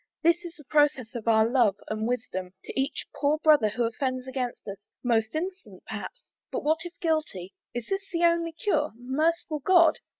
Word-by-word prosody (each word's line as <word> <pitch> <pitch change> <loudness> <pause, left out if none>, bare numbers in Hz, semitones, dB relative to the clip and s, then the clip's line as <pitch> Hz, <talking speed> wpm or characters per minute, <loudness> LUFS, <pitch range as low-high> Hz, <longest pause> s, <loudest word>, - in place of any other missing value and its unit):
This 340 +2 +4
is 345 -1 -8
the 300 - -15
process 285 -4 +2
of 230 -2 -6
our 220 -1 +5
love 235 -5 +3
and 215 +1 -2
wisdom, 190 -7 -3
To - - -7
each 275 +3 -3
poor 295 +1 +2
brother 300 -8 +5
who 235 +3 -1
offends 255 +2 -2
against 255 -3 -4
us 200 0 -8
Most 225 0 +1
innocent, 370 +4 -5
perhaps - - -7 0.2
and - - -3
what 315 +2 +3
if 350 - -9
guilty? 305 - -1 0.2
Is 240 -2 -3
this 390 0 -3
the 340 -1 0
only 335 -1 +3
cure? 320 - 0
Merciful 305 +5 0
God? 340 +2 +5
285 Hz, 180 wpm, -27 LUFS, 230-330 Hz, 0.2 s, our